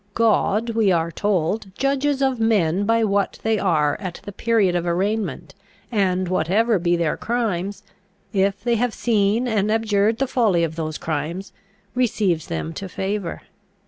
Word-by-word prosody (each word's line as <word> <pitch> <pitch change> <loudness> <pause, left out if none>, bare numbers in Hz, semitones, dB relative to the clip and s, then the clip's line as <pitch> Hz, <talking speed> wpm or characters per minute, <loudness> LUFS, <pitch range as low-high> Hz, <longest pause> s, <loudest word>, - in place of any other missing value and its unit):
God, 225 0 +2
we 220 -3 +2
are 170 -1 +1
told, 200 +2 -1
judges 275 +1 +1
of 265 -3 +1
men 205 -4 +2
by 230 +1 +2
what 200 -1 0
they 220 -1 +1
are 155 -6 +2
at 185 -4 -6
the 205 - -7
period 205 -3 +1
of 175 - 0
arraignment, 200 +5 -1 0.4
and 185 -4 +1
whatever 195 +5 +2
be 175 0 +2
their 170 -3 0
crimes, 205 -4 -2 0.5
if 195 0 +1
they 235 -1 +2
have 245 0 0
seen 220 +1 +1
and 215 -2 +1
abjured 220 -1 +2
the 270 - +1
folly 220 -10 +2
of 160 -1 -2
those 155 -2 -3
crimes, 165 +5 -4 0.4
receives 205 - 0
them 165 -1 -4
to 190 +2 -6
favour. 190 -2 -3
200 Hz, 155 wpm, -22 LUFS, 175-225 Hz, 0.5 s, God